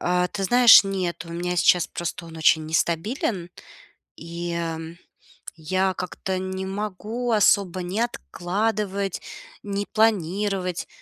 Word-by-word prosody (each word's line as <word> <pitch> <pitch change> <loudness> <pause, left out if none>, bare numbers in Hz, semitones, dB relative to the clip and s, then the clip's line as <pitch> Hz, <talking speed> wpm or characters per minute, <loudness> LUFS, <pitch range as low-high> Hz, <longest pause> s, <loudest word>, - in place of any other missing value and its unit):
А, 180 0 +1
ты 195 -2 -4
знаешь, 240 -1 +8
нет. 185 -3 -3
У - - -10
меня 180 +1 -3
сейчас 175 0 +4
просто 175 0 -5
он 165 0 -11
очень 160 0 +3
нестабилен, 170 - -1 0.7
и, 170 +1 -6
м, 165 0 -4 0.6
я 185 +4 0
как-то 185 +1 -4
не 190 0 -4
могу 215 +4 -3
особо 195 -3 +3
ни 185 +5 -3
откладывать, 200 -2 -2 0.4
ни 200 0 -3
планировать. 195 -3 0
185 Hz, 120 wpm, -24 LUFS, 170-205 Hz, 0.7 s, знаешь